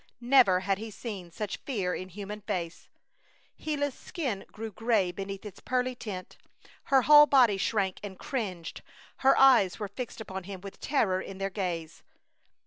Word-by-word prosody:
Never 240 -7 +5
had 195 +1 0
he 220 +1 -6
seen 200 -4 -7
such 205 +4 -5
fear 195 -9 -2
in 185 - -5
human 205 +3 -7
face. 180 -5 -4 0.7
Gila's 285 -3 -1
skin 250 - -4
grew 220 0 -6
gray 215 -4 +1
beneath 195 +2 -6
its 205 - -9
pearly 255 0 -1
tint, 200 -6 -7 0.5
her 270 -2 +4
whole 295 +1 +9
body 245 -8 +5
shrank 195 -1 0
and 195 -2 -8
cringed, 185 -10 -4 0.4
her 270 0 +4
eyes 245 -9 +6
were 210 - -4
fixed 240 +4 -6
upon 190 -4 -6
him 195 -1 -7
with 195 0 -10
terror 195 -10 +1
in 195 - -8
their 195 0 -2
gaze. 175 -5 -4
205 Hz, 160 wpm, -29 LUFS, 190-245 Hz, 0.7 s, whole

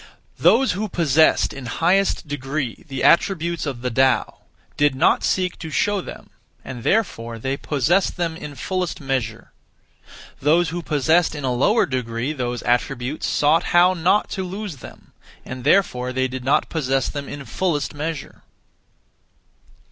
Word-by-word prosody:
(Those 265 +3 +4
who) 205 +4 -3
possessed 160 -3 +3
in 135 -3 -8
highest 180 +6 +1
degree 140 0 -4
the 135 -2 -4
attributes 170 -2 +2
(of 130 -4 -5
the 125 - -1
Tao) 130 -1 +1 0.4
did 145 -2 +2
not 130 - +3
(seek) 185 -1 0
to 160 - -6
show 205 +6 0
them, - - -11 0.3
and 125 -2 -7
therefore 115 - 0
they 135 +4 -2
possessed 155 +9 0
them 170 -2 -1
(in 150 -3 -8
fullest 180 +5 -3
measure). 125 -5 -3 0.9
(Those 160 +5 +3
who) 175 +1 -4
possessed 160 +2 +2
in 145 - -6
a 130 -1 0
lower 205 - +3
degree 125 +1 -3
those 125 -4 -3
attributes 125 +3 -1
(sought 150 +3 +2
how) 180 +1 +6
not 185 +4 +2
to 190 - -3
lose 190 -3 -6
them, - - -14 0.3
and 125 0 -7
therefore 125 -6 +2
they 130 0 0
did 130 0 -6
not 135 +3 +2
possess 135 -4 0
them 145 -2 -5
(in 140 -1 -7
fullest 160 -5 -1
measure). 155 +1 -5
145 Hz, 150 wpm, -21 LUFS, 130-175 Hz, 0.9 s, how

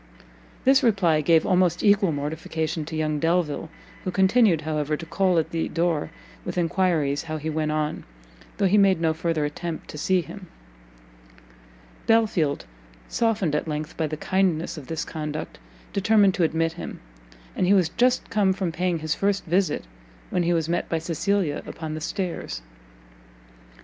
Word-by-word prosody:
This 265 +2 +6
reply 190 - +3
gave 160 +1 +4
almost 180 -2 +2
equal 200 -3 +4
mortification 155 +2 -3
to 160 - -6
young 155 -1 0
Delvile, 165 -1 0 0.3
who - - -2
continued, 190 -2 +4
however, 150 -1 -1
to 165 - -8
call 180 +2 +1
at 160 - 0
the 165 -1 -1
door 165 -3 0 0.3
with - - -5
enquiries 165 -5 +1
how 155 -1 -3
he 155 +1 -3
went 155 0 -1
on, 155 0 -2 0.5
though 200 - +2
he 200 +2 +4
made 195 -3 +4
no 165 -1 +2
further 160 -1 -1
attempt 160 +2 -5
to 150 - -7
see 185 +3 +2
him. 185 +2 -10 1.6
Belfield, 210 -10 +2 0.4
softened 215 -9 +1
at 150 - -1
length 150 0 -4
by 160 - -1
the 155 +1 -4
kindness 180 -1 0
of 145 -5 -9
this 160 -1 -3
conduct, 155 -1 -5 0.3
determined 205 -1 +4
to 185 -3 +1
admit 165 0 +1
him; 175 - -7 0.6
and 180 - +1
he 195 - +5
was 180 -5 +3
just 250 +6 +2
come 200 -3 +3
from 185 -3 -2
paying 175 +1 0
his 155 0 -1
first 200 +1 0
visit, 180 - +1 0.5
when 180 - +1
he 175 0 +1
was 165 -2 +1
met 170 +1 -1
by 165 - 0
Cecilia 165 0 -1
upon 160 -1 -6
the 155 - -5
stairs. 175 - -4
165 Hz, 165 wpm, -25 LUFS, 155-190 Hz, 1.6 s, This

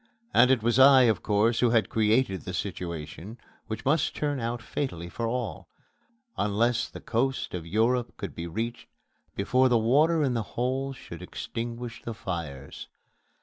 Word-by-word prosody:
And 125 +2 +6
it 130 -4 +3
was 120 +2 +2
I, 135 -1 +8
of 110 -6 +2
course, 110 +3 +2
who 120 - +4
had 115 -1 +3
created 110 -2 +2
the 90 - -5
situation 90 +3 -5 0.3
which 110 - -5
must 150 +4 +2
turn 145 -2 -1
out 120 +1 -2
fatally 90 - -4
for 115 +6 -3
all, 120 0 -4 0.7
unless 115 +4 +1
the - - -9
coast 130 +4 -1
of 85 -2 -5
Europe 115 +6 +1
could - - -6
be 85 +1 -5
reached 115 +7 -4 0.5
before 130 +6 +3
the 120 - +4
water 150 +8 +3
in 130 -3 +1
the 115 - 0 0.2
hold 130 +2 -1
should - - -10
extinguish 120 0 -6
the 115 - -6
fires. 80 -9 -6
115 Hz, 160 wpm, -27 LUFS, 105-125 Hz, 0.7 s, I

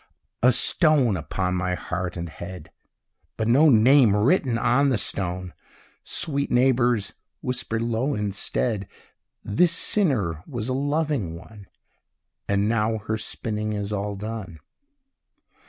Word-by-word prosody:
A 125 - +6
stone 140 - +3
upon 90 +2 -2
my 90 0 -1
heart 90 +1 -4
and 85 0 -4
head, 85 +1 -9 0.7
But 110 - -1
no 140 +7 +5
name 120 -2 +5
written 120 - +2
on 135 +4 +2
the 130 - +1
stone! 90 -2 -2 0.5
Sweet 140 -2 -1
neighbours, 120 -4 +2 0.3
whisper 125 -3 -2
low 120 +5 -1
instead, 105 0 -2 0.6
"This 170 +12 +2
sinner 115 - +1
was 120 -4 -4
a - - 0
loving 145 - -1
one, 100 +3 -13 0.8
And 100 +1 +1
now 110 0 +1
her 110 +1 -3
spinning 105 0 -3
is 105 0 -3
all 100 0 -3
done." 105 -4 -6
110 Hz, 120 wpm, -24 LUFS, 100-130 Hz, 0.8 s, A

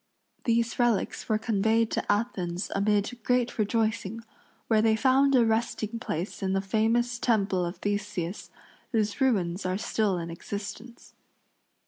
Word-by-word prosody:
These 235 0 +1
relics 240 -2 0
were 215 - +3
conveyed 220 +1 +1
to - - 0
Athens 195 -4 -2
amid 205 +4 0
great 250 -2 +1
rejoicing, 220 0 0 0.4
where 220 -2 +3
they 220 0 +4
found 270 +3 +4
a 240 -2 +5
resting 225 0 -1
place 180 -2 -4
in 190 -1 0
the 195 - +2
famous 225 +4 +1
temple 200 -6 +1
of 175 +2 -3
Theseus, 205 -3 -3 0.4
whose 215 +2 0
ruins 195 -8 +1
are 185 0 -1
still 210 -2 0
in 170 -1 -5
existence. 205 +6 -8
215 Hz, 135 wpm, -28 LUFS, 195-230 Hz, 0.4 s, a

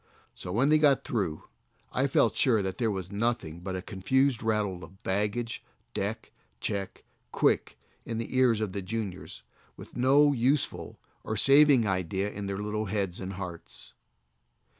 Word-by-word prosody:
So 90 - -7
when 130 +9 +2
he 155 - +6
got 145 -3 +4
through 95 -10 -2 0.5
I - - +2
felt - - +2
sure 110 -5 +3
that 95 +2 -4
there 115 -2 +1
was 95 -2 -4
nothing 100 -7 -1
but 95 +1 -5
a 90 - -5
confused 120 +6 +1
rattle 105 -5 -1
of 95 - -14
"bag 100 +2 0
gage, 120 0 -4 0.3
deck, - - -3 0.3
check, 100 +3 -4 0.3
quick," - - +1 0.3
in 115 - -4
the 115 +3 -4
ears 125 -4 +4
of 105 -3 -2
the 100 - -3
juniors, 95 - -5 0.3
with - - -12
no 140 +3 +4
useful 130 +3 0 0.3
or 110 - -3
saving 140 -3 +6
idea 95 +1 -1
in 100 -1 -5
their 100 0 -3
little 105 +1 -2
heads 95 -3 -2
and 95 +1 -5
hearts. 90 -3 -8
105 Hz, 160 wpm, -28 LUFS, 95-120 Hz, 0.5 s, he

